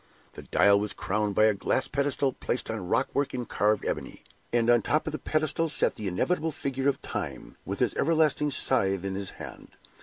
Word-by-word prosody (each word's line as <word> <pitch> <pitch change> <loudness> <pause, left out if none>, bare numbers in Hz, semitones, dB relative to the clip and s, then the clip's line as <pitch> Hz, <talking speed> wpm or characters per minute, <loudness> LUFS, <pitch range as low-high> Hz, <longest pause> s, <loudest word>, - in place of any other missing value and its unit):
The - - -9
dial 100 0 +4
was 105 +1 -2
crowned 105 0 -1
by 110 - +5
a 110 - +4
glass 100 +6 0
pedestal 140 -1 0
placed 120 -1 -3
on 105 -5 -5
rock 115 +7 +1
work 140 -2 -1
in 125 -1 -3
carved 105 +1 +1
ebony; - - -4 0.3
and 115 -1 +2
on 120 0 +6
the - - -8
top 155 +1 +2
of 155 - -2
the 155 - -4
pedestal 155 +1 0
sat - - +2
the 105 - -5
inevitable 160 - 0
figure 135 -1 -1
of 140 - -2
Time, - - -5
with - - -4
his - - +1
everlasting 155 -2 +2
scythe 95 -9 +1
in 95 - -2
his 100 0 -3
hand. - - -9
125 Hz, 210 wpm, -27 LUFS, 105-145 Hz, 0.3 s, on